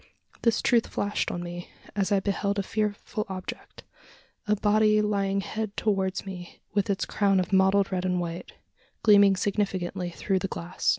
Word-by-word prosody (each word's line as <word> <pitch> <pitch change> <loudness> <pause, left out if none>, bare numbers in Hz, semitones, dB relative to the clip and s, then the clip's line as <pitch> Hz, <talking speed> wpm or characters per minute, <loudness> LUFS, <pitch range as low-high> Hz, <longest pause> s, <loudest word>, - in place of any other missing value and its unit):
This 230 -1 +2
truth 235 -2 +3
flashed 205 +1 -1
on 175 - -4
me, 175 0 -7 0.3
as 200 -1 0
I 200 - +4
beheld 200 +1 -1
a 200 - 0
fearful 210 +1 -2
object 185 -1 -7 0.6
a 210 - +3
body 215 +1 +3
lying 200 -2 +1
head 215 +1 -4
towards 195 -3 0
me, 180 -3 -8
with 205 -1 0
its 200 -1 0
crown 200 -2 +2
of 185 +1 -2
mottled 190 +1 +4
red 185 -1 -1
and 180 -1 0
white, 175 0 -5 0.5
gleaming 205 -3 +6
significantly 190 -2 -1
through 190 +2 -1
the 195 - -2
glass. 175 0 -3
195 Hz, 165 wpm, -27 LUFS, 185-210 Hz, 0.6 s, gleaming